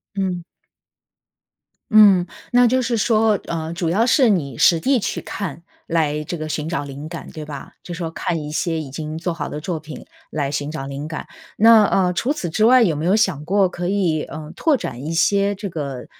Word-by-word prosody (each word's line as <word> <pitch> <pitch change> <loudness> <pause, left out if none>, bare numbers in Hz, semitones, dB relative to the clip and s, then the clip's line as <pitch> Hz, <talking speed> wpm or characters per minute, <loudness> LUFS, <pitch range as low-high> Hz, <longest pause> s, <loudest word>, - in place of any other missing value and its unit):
嗯。 185 -3 -2 1.5
嗯， 200 -5 +7 0.2
那 245 0 +5
就 255 +2 +2
是 235 0 0
说， 220 -2 +2
呃， 160 0 -4
主 170 -1 -2
要 215 +7 +2
是 255 -1 +4
你 140 - 0
实 165 -2 +5
地 265 +5 +2
去 - - -3
看， 170 -5 -6 0.2
来 150 -2 0
这 170 +3 -5
个 155 - -5
寻 155 0 -3
找 165 -4 -2
灵 140 +2 -8
感， 170 - -8
对 155 -1 -7
吧？ 145 -2 -9
就 175 - -7
说 165 -1 -4
看 165 -2 -2
一 150 - -6
些 165 +1 -1
已 145 -4 -7
经 155 +3 -5
做 170 +1 -2
好 150 -3 -5
的 150 - -5
作 165 0 -3
品 155 0 -10 0.2
来 145 -2 -2
寻 145 0 -2
找 150 -3 -5
灵 140 +2 -6
感， 155 -1 -6 0.3
那 225 0 +7
呃， 185 -2 +2
除 240 +10 0
此 185 - -3
之 215 - +1
外 245 +1 +7
有 165 -7 +2
没 155 +3 -3
有 190 +4 +4
想 185 -9 +1
过 195 +3 +2
可 175 0 -4
以， 180 -6 +1
呃， 155 0 -8
拓 310 -5 +2
展 125 - -6
一 155 - -4
些 200 +3 +2
这 200 +1 -5
个， 140 -7 -5
170 Hz, 225 characters per minute, -21 LUFS, 150-200 Hz, 1.5 s, 嗯